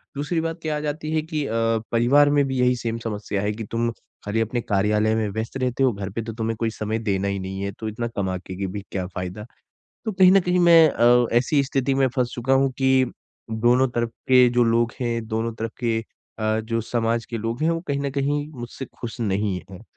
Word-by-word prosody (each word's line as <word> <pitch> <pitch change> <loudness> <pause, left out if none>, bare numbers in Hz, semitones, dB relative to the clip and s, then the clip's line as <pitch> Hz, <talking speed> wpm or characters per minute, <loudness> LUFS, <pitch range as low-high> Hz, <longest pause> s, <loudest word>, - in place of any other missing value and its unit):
दूसरी 145 +4 -1
बात 165 +1 -3
क्या 155 -2 -1
आ - - -2
जाती 150 +1 -3
है 155 - +2
कि 155 -2 -3
अ, 115 - -4 0.4
परिवार 135 +5 +5
में 145 0 +3
भी 130 -1 -2
यही 125 0 +3
सेम 115 -1 -3
समस्या 105 -3 -3
है 105 - 0
कि, 110 +1 -6
"तुम 115 +2 -1 0.4
खाली 105 +2 -1
अपने 120 +2 -1
कार्यालय 105 +1 +1
में 110 -1 0
व्यस्त 110 +5 -4
रहते 130 0 0
हो, 130 - +4
घर 100 -1 -5
पे 115 +4 -3
तो 115 0 -6
तुम्हें 115 0 -2
कोई 115 - +1
समय 110 0 -3
देना 100 -3 -1
ही 100 - -1
नहीं 95 +1 -5
है, 100 0 -2
तो 110 - -7
इतना 115 +2 -3
कमा 95 -2 -1
के 95 +1 -9
कि 95 0 -2
भी 100 +2 -5
क्या 95 -2 -2
फ़ायदा?" 90 +3 -6 0.6
तो 220 - -1
कहीं 185 -1 +6
ना 195 - +7
कहीं 180 0 +1
मैं 170 -2 +7
अ, 120 -1 +4
ऐसी 140 +3 +2
स्थिति 135 0 0
में 135 -1 +3
फँस 125 -2 0
चुका 125 +2 +1
हूँ 135 0 +3
कि 130 -1 +4 0.6
दोनों 125 +2 +5
तरफ 120 -1 0 0.2
के 125 -1 +7
जो 120 0 +3
लोग 115 0 +2
हैं, 115 -2 -2
दोनों 115 +1 -2
तरफ 115 0 -4
के 115 -3 0 0.4
अ, 110 0 +1
जो 115 +1 -2
समाज 115 0 -1
के 115 - -5
लोग 115 +4 -3
हैं, 160 - +3
वो 165 0 0
कहीं 140 -1 -1
ना 140 - -1
कहीं 145 +1 0
मुझसे 120 +3 -6
खुश 115 -1 -6
नहीं 100 -2 0
हैं। 95 +4 -11
115 Hz, 235 wpm, -23 LUFS, 110-135 Hz, 0.6 s, ना